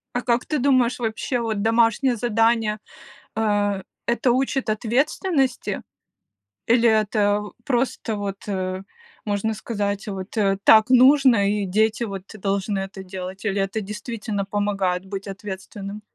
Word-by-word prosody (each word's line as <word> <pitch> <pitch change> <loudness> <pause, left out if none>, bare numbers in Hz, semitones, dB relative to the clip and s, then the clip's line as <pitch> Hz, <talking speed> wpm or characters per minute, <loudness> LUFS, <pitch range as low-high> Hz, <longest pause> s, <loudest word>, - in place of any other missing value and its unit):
А 245 - +1
как 240 0 +1
ты 305 -3 -1
думаешь, 255 -2 +2
вообще, 230 +2 -2
вот 220 -3 -2
домашнее 230 +3 +3
задание, 225 -1 +1 0.6
э, 205 -3 +1 0.2
это 235 +1 +2
учит 265 -1 0
ответственности? 265 - 0 0.9
Или 235 0 +4
это, 210 -1 +2 0.2
просто 240 -3 -1
вот, 200 -1 -5
э, 185 -1 -3 0.4
можно 210 +1 -1
сказать, 205 -2 -3
вот, 195 +2 -6
э: 195 -2 +2
"Так 220 +2 +7
нужно"- 255 -5 +6
и 205 -1 0
дети 220 +4 +1
вот 195 -3 -6
должны 200 0 -1
это 195 0 -6
делать, 185 +1 -7
или 200 -1 0
это 195 +3 -1
действительно 210 0 -4
помогает 195 -3 -1
быть 195 0 -6
ответственным? 195 +1 -7
215 Hz, 130 wpm, -23 LUFS, 200-235 Hz, 0.9 s, Так